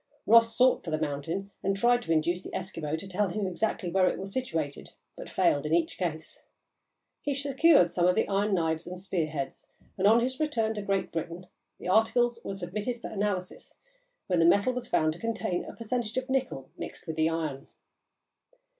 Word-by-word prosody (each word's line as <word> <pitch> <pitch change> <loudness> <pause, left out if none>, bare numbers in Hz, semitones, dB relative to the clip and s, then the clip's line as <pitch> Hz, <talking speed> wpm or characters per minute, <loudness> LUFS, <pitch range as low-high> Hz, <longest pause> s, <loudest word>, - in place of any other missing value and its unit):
Ross 230 +1 +5
sought 255 0 +4
for 170 - -5
the 155 - 0
mountain, 155 +6 -3
and 195 +1 0
tried 240 +3 +3
to 165 - -4
induce 170 +3 +1
the - - -8
Eskimo 165 -5 -3
to 195 - -8
tell 195 +2 0
him 200 +3 -2
exactly 190 +1 -1
where 185 0 +4
it - - 0
was 195 +1 -5
situated, 165 - -3 0.3
but - - -9
failed 145 - +2
in 155 +2 +1
each 170 -1 0
case. 160 -3 -4 0.8
He 285 -1 -1
secured 280 - +4
some 175 0 +2
of 180 - +3
the - - +1
iron 200 +1 +1
knives 160 -1 -1
and 180 0 -5
spear 180 -4 -1
heads, 140 -3 -5 0.3
and, - - +4
on 225 +3 +6
his 260 +2 -2
return 230 -8 0
to 210 - -4
Great 195 -1 -1
Britain, 170 +2 -5 0.3
the - - -8
articles 230 +4 +3
were 195 - -4
submitted 210 +6 -3
to - - -5
analysis, 200 -3 -3 0.5
when 180 -3 +1
the 165 - +5
metal 200 +8 +4
was 250 -1 -4
found 155 0 +2
to 170 - -12
contain 220 -6 -2
a - - -9
percentage 230 0 -3
of 260 +1 -2
nickel 260 - -2
mixed - - -7
with 160 - -4
the 160 0 +2
iron. 155 -4 -3
190 Hz, 200 wpm, -28 LUFS, 165-230 Hz, 0.8 s, on